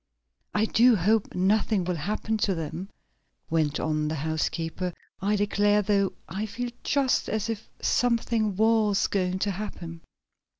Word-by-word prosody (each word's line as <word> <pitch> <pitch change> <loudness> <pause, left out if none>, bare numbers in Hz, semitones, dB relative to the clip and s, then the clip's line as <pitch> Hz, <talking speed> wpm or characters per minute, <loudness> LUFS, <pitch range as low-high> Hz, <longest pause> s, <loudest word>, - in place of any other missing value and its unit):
"I 210 +1 +3
do 235 +2 +5
hope 210 +3 +1
nothing 195 +1 +2
will 180 +1 -1
happen 210 +7 -2
to 195 -2 +1
them," 165 +4 -5 0.6
went 155 -3 +1
on 155 -1 0
the 155 - -2
housekeeper. 160 +3 -2 0.3
"I 205 +2 +1
declare, 205 0 +2
though, 200 -1 +1
I 205 +4 -3
feel 240 +4 -4
just 275 -3 +1
as 220 +1 -1
if 220 -1 -7
something 230 -4 +1
was 220 -1 +3
going 185 -2 0
to 200 +2 0
happen." 175 -4 -6
205 Hz, 140 wpm, -27 LUFS, 175-220 Hz, 0.6 s, do